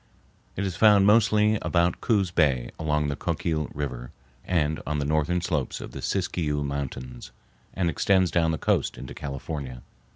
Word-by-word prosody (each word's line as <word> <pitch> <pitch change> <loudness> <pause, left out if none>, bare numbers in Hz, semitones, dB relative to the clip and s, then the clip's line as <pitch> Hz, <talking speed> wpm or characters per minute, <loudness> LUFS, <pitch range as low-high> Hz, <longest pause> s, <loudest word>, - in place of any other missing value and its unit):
It 100 - -2
is 95 -3 -3
found 105 -1 +6
mostly 105 0 +4
about 85 0 +1
Coos 100 -6 +1
Bay, 70 -8 +1
along 75 -1 0
the 70 - -2
Coquille 75 0 -2
River, 65 -4 -5 0.3
and 80 -4 0
on 75 0 -1
the 70 - -1
northern 80 +4 +1
slopes 75 -7 -2
of - - -8
the - - -7
Siskiyou 80 -6 -1
Mountains, 65 -3 -5 0.5
and 90 -2 0
extends 95 +2 +2
down 85 -2 +2
the 80 - 0
coast - - 0
into 65 - -8
California. 70 -2 -6
80 Hz, 160 wpm, -26 LUFS, 70-90 Hz, 0.5 s, found